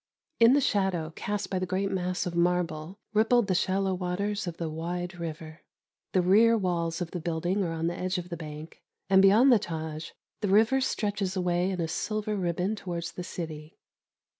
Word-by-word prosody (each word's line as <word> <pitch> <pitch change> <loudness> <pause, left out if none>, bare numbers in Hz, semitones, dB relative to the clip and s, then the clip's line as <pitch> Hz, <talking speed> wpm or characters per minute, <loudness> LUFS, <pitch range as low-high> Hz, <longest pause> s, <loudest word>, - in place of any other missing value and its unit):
In 230 +2 +7
the 285 - +4
shadow, 190 -8 0
cast 205 -2 -3
by 190 - 0
the 185 - -2
great 195 +2 -1
mass 185 -1 -1
of 180 - -3
marble, 170 0 0 0.2
rippled 225 +2 +4
the 190 - 0
shallow 190 +1 +1
waters 190 +3 -2
of 170 - -5
the 165 - -3
wide 175 +3 -4
river. 160 -1 -7 0.5
The 185 - +3
rear 225 +5 +5
walls 170 -3 -1
of 170 - -3
the 180 - -4
building 175 +4 -1
are 170 - -2
on 165 0 -2
the 170 +1 -1
edge 185 +1 -1
of 180 0 -5
the 170 - -4
bank, 155 -1 -9 0.3
and 190 0 +7
beyond 215 +8 +6
the 235 - +6
Tâj 160 -2 -5 0.3
the 210 - -1
river 225 +7 +4
stretches 205 -6 -1
away 180 0 +1
in 185 -2 -3
a 165 - 0
silver 215 +5 -2
ribbon 180 +2 -1
towards 170 -4 -5
the 180 - -6
city. 160 -3 -7
180 Hz, 190 wpm, -28 LUFS, 170-200 Hz, 0.5 s, In